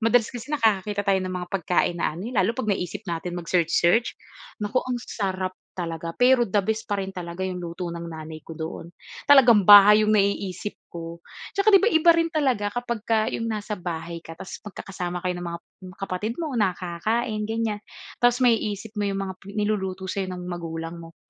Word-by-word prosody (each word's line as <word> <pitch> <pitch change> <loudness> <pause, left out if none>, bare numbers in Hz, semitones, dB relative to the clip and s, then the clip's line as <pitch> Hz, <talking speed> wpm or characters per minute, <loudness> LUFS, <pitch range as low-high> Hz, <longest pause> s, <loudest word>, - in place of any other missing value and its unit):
Madalas 230 0 +4
kasi 245 +1 -8
nakakakita 210 -6 +1
tayo 195 -1 +2
ng 185 0 -3
mga 180 - -6
pagkain 180 -1 +1
na 165 - 0
ano 180 +8 -6
eh, 250 - -7
lalo 195 +3 +3
'pag 260 -5 -3
naisip 195 -1 -1
natin 175 +1 -3
mag-search-search, 175 +4 +2 0.4
naku, 210 +4 -3
ang 250 -1 -2
sarap 190 -5 -3 0.2
talaga! 165 -2 -4
Pero 250 0 +5
the 205 -1 +1
best 220 +3 -2
pa 205 -2 -2
rin 190 - -4
talaga 170 0 -6
yung 185 - -4
luto 175 +1 -5
ng 170 0 -6
nanay 160 -1 -8
ko - - -9
doon. 160 +1 -7 0.3
Talagang 245 -8 +7
bahay 210 +2 +9
yung 215 - +2
naiisip 200 -1 0 0.2
ko. 165 0 -6 0.4
Tsaka 400 +2 +4
'di 390 - +8
ba, 440 - +4
iba 335 -4 +6
rin 330 0 +1
talaga 260 - +1
kapagka 225 -2 0
yung 230 - -2
nasa 215 -1 -4
bahay 170 -1 -5
ka, 165 0 -11
tapos 185 - -8
magkakasama 180 -3 -5
kayo 180 - +1
ng 175 - -5
mga 170 0 -5 0.4
kapatid 195 +4 -3
mo, 320 -4 -3
na 185 -4 +2
kakain 215 +5 -2
ganyan. 225 -2 -1 0.4
Tapos 245 +1 +3
maiisip 220 -3 +1
mo - - +1
yung 195 0 -2
mga 190 - -4 0.2
niluluto 190 -3 -1
sa'yo 190 0 -3
ng 180 -1 -6
magulang 165 -1 -5
mo. 165 -1 -13
195 Hz, 190 wpm, -25 LUFS, 175-225 Hz, 0.4 s, bahay